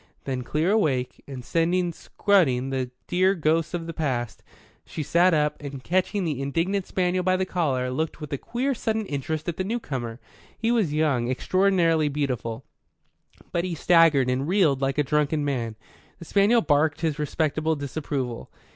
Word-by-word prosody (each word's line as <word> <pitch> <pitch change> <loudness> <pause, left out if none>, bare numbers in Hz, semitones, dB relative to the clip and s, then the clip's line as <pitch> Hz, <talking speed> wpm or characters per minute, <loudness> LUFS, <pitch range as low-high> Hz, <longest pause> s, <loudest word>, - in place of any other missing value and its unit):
Then 130 -2 -3
clear 155 +8 0
awake, 140 - 0
and 130 -3 -8
sending 175 +1 +1
scudding 135 -11 +1
the 130 -2 -2 0.2
dear 185 +2 +2
ghosts 165 +1 +1
of 165 -1 -4
the 165 - -5
past, 130 -7 -2 0.4
she 155 - -5
sat 175 +5 +4
up, 150 -2 +1
and 140 -2 -7
catching 185 +3 0
the 145 -5 -2
indignant 170 +8 -1
spaniel 185 0 0
by 185 0 +2
the 190 - 0
collar, 135 -9 -1
looked 155 +5 -2
with 150 -1 -7
a - - 0
queer, 260 +4 -1
sudden 220 -2 -2
interest 155 0 -3
at 170 - -2
the 185 - -1
newcomer. 135 - -4 0.4
He 230 +1 0
was 220 -10 +2
young, 145 -6 +1
extraordinarily 165 +1 +2
beautiful; 130 -4 -3 0.9
but 170 - 0
he 180 -2 -3
staggered 165 -5 +4
and 130 +3 0
reeled 165 -8 +3
like 135 0 0
a 150 - +3
drunken 150 +1 +1
man. 120 -6 -2 0.4
The 170 - -11
spaniel 205 +6 +4
barked 150 -2 +2
his 160 -3 -1
respectable 155 +1 0
disapproval. 140 -3 -4
155 Hz, 165 wpm, -25 LUFS, 135-180 Hz, 0.9 s, sat